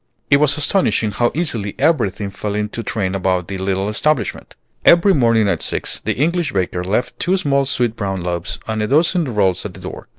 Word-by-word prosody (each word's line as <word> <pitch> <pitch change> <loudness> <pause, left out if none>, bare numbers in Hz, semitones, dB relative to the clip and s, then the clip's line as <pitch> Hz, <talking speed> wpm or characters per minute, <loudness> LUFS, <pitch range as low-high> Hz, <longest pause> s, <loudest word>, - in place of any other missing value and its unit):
It 140 - +7
was 145 0 +3
astonishing 150 - +1
how 120 +4 +1
easily 120 - -1
everything 115 - +1
fell 105 +1 -4
into 105 +2 -3
train 100 -4 -2
about 95 -2 0
the 95 -1 -5
little 95 +1 -1
establishment. 120 +2 -1 0.3
Every 175 +3 +6
morning 115 - +3
at 100 - 0
six - - -3
the - - 0
English 170 +3 0
baker 90 -2 -1
left 105 +7 -2
two 190 -1 +1
small 140 -6 +1
sweet 120 -4 0
brown 95 -3 -3
loaves 85 -1 -3
and 110 -1 -2
a 105 - 0
dozen 165 - +2
rolls 105 -8 0
at - - -7
the - - -10
door. - - -8
110 Hz, 195 wpm, -18 LUFS, 100-145 Hz, 0.3 s, It